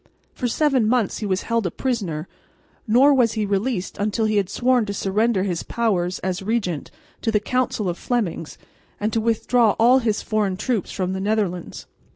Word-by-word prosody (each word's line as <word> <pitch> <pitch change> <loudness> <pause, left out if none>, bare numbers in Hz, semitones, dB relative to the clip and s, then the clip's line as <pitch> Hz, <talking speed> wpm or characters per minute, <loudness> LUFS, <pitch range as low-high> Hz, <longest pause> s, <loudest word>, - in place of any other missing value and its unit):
For 250 - -2
seven 265 -3 +2
months 240 -4 +1
he 210 - -3
was 190 0 -1
held 230 -4 0
a - - -1
prisoner; 185 - -3 0.6
nor 260 +6 +5
was 245 -4 +3
he 215 -2 -1
released 200 0 -2
until 215 +2 0
he 215 -1 +1
had 195 -2 +1
sworn 250 +3 +2
to 200 - -3
surrender 200 +1 +1
his 180 -4 -2
powers, 185 -6 -1
as 185 +1 -2
regent, 195 -7 -2 0.3
to 225 - 0
a - - +1
council 235 -2 -1
of 175 -1 -3
Flemings 210 -10 -2 0.4
and 215 +1 -1
to 225 - +1
withdraw 230 0 +2
all 245 +3 +6
his 220 -4 -1
foreign 210 -4 0
troops 220 0 -2
from 185 0 -2
the 190 - -3
Netherlands. 200 -4 -2
215 Hz, 185 wpm, -22 LUFS, 190-235 Hz, 0.6 s, all